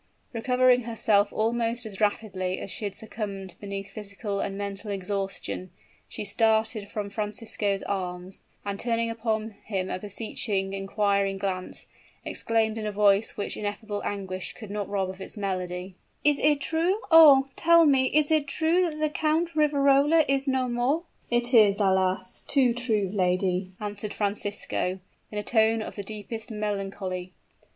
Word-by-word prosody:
Recovering 250 +1 +3
herself 215 -3 +2
almost 230 +1 0
as 210 -1 -7
rapidly 190 -3 0
as 195 - -7
she 210 - -4
had 200 - -4
succumbed 200 -4 -5
beneath 200 -1 -6
physical 200 -1 -5
and 195 0 -3
mental 200 +1 -5
exhaustion, 195 -1 -3 0.4
she - - -5
started 220 0 +1
from 205 -2 -4
Francisco's 210 -1 -2
arms; 185 -1 -4 0.2
and 200 0 -3
turning 230 -1 0
upon 220 -1 -2
him 190 -3 -2
a - - -2
beseeching, 200 -1 -2
inquiring 195 0 0
glance, 190 -2 -3 0.4
exclaimed 225 -1 +1
in 215 - -3
a - - -1
voice 205 +1 +3
which 200 - -3
ineffable 205 0 -4
anguish 190 -2 -4
could 215 -4 -10
not 205 -1 -3
rob 195 -2 0
of 185 +1 -8
its 190 - -7
melody: 185 -2 -3 0.3
"Is 295 -1 +4
it 295 -1 +3
true 340 +8 0
oh, 295 -5 +9
tell 335 0 +5
me 270 -3 +4
is 300 +2 +2
it 305 -2 +3
true 340 +4 +2
that 305 -1 -8
the 305 0 +1
Count 315 +2 0
Riverola 290 +1 +4
is 275 0 +1
no 260 -1 +1
more?" 250 +7 0 0.3
"It 240 +1 +1
is, 210 -3 +6
alas! 190 -1 +1
too 260 -4 +3
true, 220 -6 0
lady," 185 -1 0
answered 210 0 -5
Francisco, 205 -2 -2 0.3
in 210 - -5
a 210 - -2
tone 220 0 +2
of - - -8
the 205 - -4
deepest 215 +3 -6
melancholy. 195 -4 -4
210 Hz, 155 wpm, -27 LUFS, 195-240 Hz, 0.4 s, oh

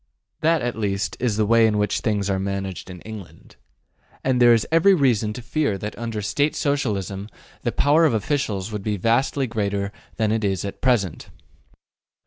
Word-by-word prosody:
That 160 -2 +2
at 120 0 -2
least 100 -2 -2
is 115 -4 0
the 110 - +2
way 115 +1 +5
in 105 -1 +1
which 105 -1 +1
things 105 -3 -1
are 95 -1 0
managed 95 -1 -4
in 90 -2 -9
England. 110 -4 -11 0.7
And 130 -1 +1
there 120 0 +8
is 115 -2 +4
every 170 +4 +5
reason 120 - +2
to 125 - -8
fear 135 -4 0
that 105 +2 -6
under 115 -3 -4
State 145 +8 0
Socialism 105 - -1 0.3
the - - -1
power 150 +3 +3
of 150 - +3
officials 110 -5 -1
would 105 -1 -4
be 105 +1 -2
vastly 125 +7 +1
greater 100 -4 -2 0.2
than 110 -2 +1
it 110 0 0
is 95 -2 0
at 100 - -7
present. 115 -10 0
110 Hz, 180 wpm, -23 LUFS, 100-125 Hz, 0.7 s, there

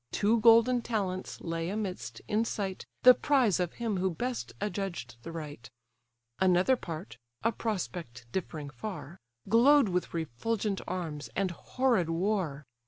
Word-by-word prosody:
Two 220 +3 +2
golden 230 +2 +6
talents 195 -6 -3
lay 165 0 -2
amidst, 200 -2 -4
in 215 +2 +2
sight, 195 -4 -4 0.2
The 255 - +11
prize 250 - +2
of 180 -2 -1
him 225 -4 -2
who 190 +1 +1
best 245 +8 -3
adjudged 190 - -4
the 165 - -7
right. 150 -7 -7 0.7
Another 185 +6 +4
part 165 - -7 0.3
(a 230 - +3
prospect 175 - -4
differing 155 -6 -4
far) 180 -2 -7 0.3
Glow'd 240 +3 +6
with 180 0 -1
refulgent 195 - -2
arms, 165 -5 -4
and 190 -1 0
horrid 230 -1 0
war. 165 -5 -1
190 Hz, 135 wpm, -30 LUFS, 165-225 Hz, 0.7 s, The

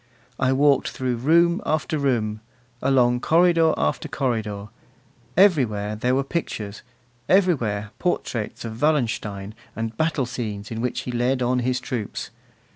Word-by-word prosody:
I 130 -1 +2
walked 140 0 +3
through 125 -2 -2
room 170 - +3
after 155 0 -1
room, 110 -6 0 0.4
along 125 -2 +3
corridor 165 +2 +4
after 75 +1 -1
corridor; 110 -6 -2 0.7
everywhere 120 - +3
there 125 +4 +1
were 135 - +1
pictures, 110 -9 -4 0.5
everywhere 120 - +2
portraits 120 - -2
of 110 +1 -7
Wallenstein, 110 -9 0 0.2
and 115 0 -4
battle 160 -1 0
scenes 110 -4 -5
in 115 0 -3
which 125 0 -1
he 125 - -5
led 125 +2 +1
on 125 +1 +1
his 125 +1 0
troops. 120 -5 -5
125 Hz, 130 wpm, -23 LUFS, 110-145 Hz, 0.7 s, corridor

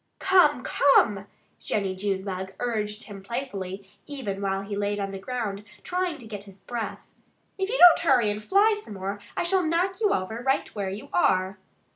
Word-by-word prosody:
"Come! 350 -9 +4
Come!" 210 -8 +3 0.3
Jennie 195 -3 -1
Junebug 190 -1 -3
urged 215 -3 -2
him 200 -2 -10
playfully, 195 -4 -5 0.2
even 245 -9 -4
while 195 0 -1
he 200 +1 -5
lay 205 0 -1
on 195 -1 -3
the 195 - -6
ground 210 -2 -4 0.2
trying 360 -3 -2
to 245 - -12
get 205 -2 -7
his 195 -1 -13
breath. 230 +3 -5 0.6
"If 385 +1 -1
you - - 0
don't 355 -5 +9
hurry 250 -9 +3
and 210 +1 -5
fly 405 - +4
some 210 - -9
more 195 +2 -4 0.2
I - - +1
shall 370 +1 +2
knock 355 +5 0
you 420 - +3
over 220 +5 -2
right 270 +2 +1
where 200 -3 -3
you 200 +3 -7
are!" 185 +1 +2
210 Hz, 180 wpm, -26 LUFS, 195-285 Hz, 0.6 s, don't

